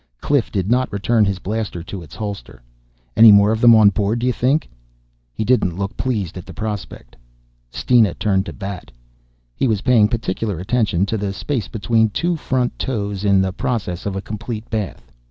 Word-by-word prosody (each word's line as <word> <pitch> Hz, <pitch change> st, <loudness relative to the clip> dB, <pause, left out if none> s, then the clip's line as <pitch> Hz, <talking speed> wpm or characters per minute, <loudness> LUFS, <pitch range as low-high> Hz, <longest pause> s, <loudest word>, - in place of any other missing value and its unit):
Cliff 145 Hz, -5 st, 0 dB
did 95 Hz, -3 st, -1 dB
not 130 Hz, +1 st, +1 dB
return 105 Hz, +2 st, +2 dB
his 100 Hz, -1 st, -1 dB
blaster 100 Hz, -3 st, -4 dB
to 100 Hz, 0 st, -7 dB
its 75 Hz, -6 st, -12 dB
holder. 100 Hz, -, -7 dB, 0.5 s
"Any 115 Hz, -1 st, +9 dB
more 100 Hz, +1 st, +6 dB
of 110 Hz, 0 st, -1 dB
them 120 Hz, -1 st, +8 dB
on 105 Hz, -2 st, +6 dB
board, 105 Hz, +3 st, 0 dB
d'you 125 Hz, +1 st, 0 dB
think?" 135 Hz, +7 st, +1 dB, 0.6 s
He 110 Hz, -, -4 dB
didn't 100 Hz, -8 st, +1 dB
look 100 Hz, +2 st, -4 dB
pleased 105 Hz, -9 st, -3 dB
at 90 Hz, -, -11 dB
the -, -, -10 dB
prospect. 105 Hz, -, -6 dB, 0.5 s
Steena 115 Hz, -, +2 dB
turned 100 Hz, -2 st, 0 dB
to -, -, -6 dB
Bat. 100 Hz, -2 st, -7 dB, 0.6 s
He 135 Hz, -, 0 dB
was 110 Hz, -4 st, 0 dB
paying 120 Hz, -5 st, +4 dB
particular 105 Hz, -3 st, -3 dB
attention 100 Hz, -2 st, 0 dB
to 110 Hz, +2 st, -2 dB
the 100 Hz, -1 st, -2 dB
space 120 Hz, -1 st, -3 dB
between 110 Hz, 0 st, +1 dB
two 170 Hz, +11 st, -1 dB
front 130 Hz, -5 st, -2 dB
toes 105 Hz, -6 st, -3 dB
in 100 Hz, -2 st, +3 dB
the 95 Hz, -1 st, -2 dB
process 105 Hz, -6 st, -3 dB
of 100 Hz, -, -3 dB
a 95 Hz, -, -4 dB
complete 110 Hz, +1 st, -6 dB
bath. 100 Hz, -, -4 dB
105 Hz, 185 wpm, -19 LUFS, 95-115 Hz, 0.6 s, Any